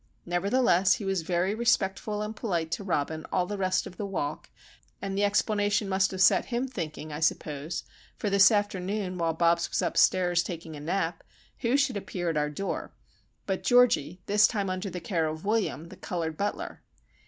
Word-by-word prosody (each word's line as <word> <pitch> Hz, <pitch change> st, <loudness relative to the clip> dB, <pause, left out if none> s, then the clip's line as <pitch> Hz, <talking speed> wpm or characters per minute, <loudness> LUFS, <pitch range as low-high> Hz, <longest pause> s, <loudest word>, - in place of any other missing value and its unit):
Nevertheless, 190 Hz, +1 st, +3 dB
he 205 Hz, -, -4 dB
was 195 Hz, -2 st, 0 dB
very 175 Hz, +4 st, 0 dB
respectful 210 Hz, -2 st, 0 dB
and 215 Hz, +1 st, -5 dB
polite 170 Hz, -8 st, -2 dB
to 200 Hz, -, -2 dB
Robin 160 Hz, -3 st, -1 dB
all 180 Hz, -1 st, +1 dB
the 205 Hz, -, -4 dB
rest 185 Hz, -1 st, 0 dB
of 175 Hz, -, -10 dB
the 205 Hz, -, -3 dB
walk, 150 Hz, -7 st, -4 dB, 0.5 s
and 195 Hz, -1 st, -4 dB
the 200 Hz, -, +1 dB
explanation 205 Hz, 0 st, +1 dB
must 190 Hz, 0 st, +2 dB
have 190 Hz, 0 st, +1 dB
set -, -, +5 dB
him 245 Hz, +2 st, -2 dB
thinking, 155 Hz, -, -6 dB
I 150 Hz, -, -4 dB
suppose, 155 Hz, 0 st, -1 dB, 0.3 s
for -, -, -3 dB
this 200 Hz, -1 st, +7 dB
afternoon 200 Hz, -3 st, -1 dB
while 165 Hz, -1 st, 0 dB
Bobs 170 Hz, +1 st, +2 dB
was -, -, 0 dB
upstairs 175 Hz, -2 st, +3 dB
taking 165 Hz, -3 st, -6 dB
a -, -, -8 dB
nap, 165 Hz, +2 st, -2 dB, 0.4 s
who 245 Hz, +2 st, +2 dB
should 275 Hz, -6 st, +1 dB
appear 175 Hz, -3 st, -3 dB
at 155 Hz, -, -2 dB
our 150 Hz, 0 st, +1 dB
door 195 Hz, +7 st, -4 dB, 0.5 s
but 190 Hz, -1 st, -2 dB
Georgie, 230 Hz, -, +3 dB
this 210 Hz, +1 st, +5 dB
time 200 Hz, -4 st, -2 dB
under 185 Hz, +2 st, -3 dB
the 180 Hz, 0 st, -5 dB
care 165 Hz, -2 st, -1 dB
of 155 Hz, +3 st, -5 dB
William, 205 Hz, -6 st, -1 dB
the -, -, -12 dB
coloured 165 Hz, -3 st, -3 dB
butler. 200 Hz, +5 st, -3 dB
185 Hz, 185 wpm, -28 LUFS, 165-205 Hz, 0.5 s, this